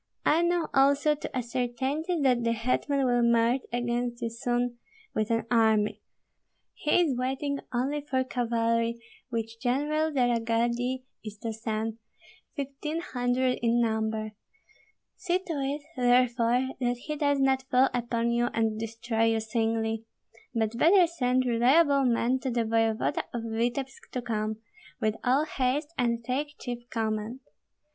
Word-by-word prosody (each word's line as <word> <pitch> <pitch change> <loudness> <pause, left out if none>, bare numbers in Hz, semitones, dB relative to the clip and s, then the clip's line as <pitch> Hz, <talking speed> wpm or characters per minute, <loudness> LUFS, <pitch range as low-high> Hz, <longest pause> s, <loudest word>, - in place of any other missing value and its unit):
I 320 +3 +4
know 345 -1 +1
also 280 +2 +4
to 290 -3 -5
a 250 - -1
certainty 260 +8 -2
that 250 -3 +3
the 230 0 +2
hetman 255 +4 0
will 245 -1 +3
march 235 +2 +3
against 240 0 -2
you 230 - -1
soon 240 +1 -1 0.3
with 215 -1 -1
an 230 -1 +1
army; 220 -3 +3 0.7
he 305 +4 +2
is 300 -7 +1
waiting 270 +3 -2
only 270 +4 -1
for 265 -3 0
cavalry 230 -2 0 0.3
which 230 -1 -4
General 295 +5 +1
de 260 -4 +2
la 240 -1 +2
Gardie 235 +3 -1 0.2
is 215 -1 -8
to 225 -1 -2
send, 220 0 -3 0.6
fifteen 285 +2 -4
hundred 250 -3 0
in 235 0 +2
number. 220 -1 0 0.9
See 365 -1 +1
to 370 -3 -6
it, 285 0 -2
therefore, 245 0 +3
that 245 -1 0
he 300 0 -3
does 285 -2 +1
not 265 0 +1
fall 255 0 +4
upon 235 -1 0
you 240 0 +2
and 220 -1 0
destroy 225 0 -1
you 225 0 +2
singly. 225 0 -1 0.5
But 225 +1 -1
better 360 +2 +6
send 255 -6 0
reliable 270 +4 +4
men 245 +1 +2
to 260 - -3
the 235 -2 0
voevoda 225 0 +1
of 235 - -3
Vityebsk 240 +4 -3
to 250 - -3
come, 215 -1 -2 0.4
with 215 -3 +1
all 265 +4 +3
haste 290 +2 -1
and 235 -3 0
take 290 +4 -2
chief 240 -1 -6
command. 220 +2 -2
245 Hz, 150 wpm, -28 LUFS, 230-270 Hz, 0.9 s, better